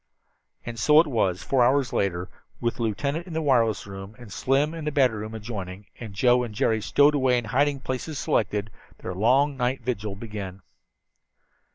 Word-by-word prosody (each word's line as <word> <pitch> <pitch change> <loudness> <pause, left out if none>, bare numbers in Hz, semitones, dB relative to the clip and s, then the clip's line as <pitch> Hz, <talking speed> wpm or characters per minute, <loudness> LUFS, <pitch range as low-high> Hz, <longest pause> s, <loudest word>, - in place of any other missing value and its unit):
And 115 -1 -6
so 150 +6 +6
it 165 - +5
was, 105 - 0
four 130 -3 +2
hours 130 +1 +2
later, 90 -2 -1 0.3
with 120 0 -1
the - - -5
lieutenant 140 - -2
in 175 - -7
the 160 - -1
wireless 115 -7 +2
room, 95 +1 -9
and 120 -5 -11
Slim 140 +4 +1
in 165 -2 -6
the 150 - -1
battery 130 -7 +2
room 110 +1 -6
adjoining, 100 -3 -6
and 110 -5 -8
Joe 125 +4 +4
and 110 -3 -6
Jerry 110 +1 +1
stowed 145 +7 +4
away 130 -3 +3
in 120 - -1
the 105 - -8
hiding 140 +2 +1
places 130 +4 -4
selected, 105 -5 0 0.3
their 90 - -4
long 130 +9 +3
night 125 0 -1
vigil 110 -5 -3
began. 100 -3 -7
120 Hz, 190 wpm, -25 LUFS, 105-135 Hz, 0.3 s, so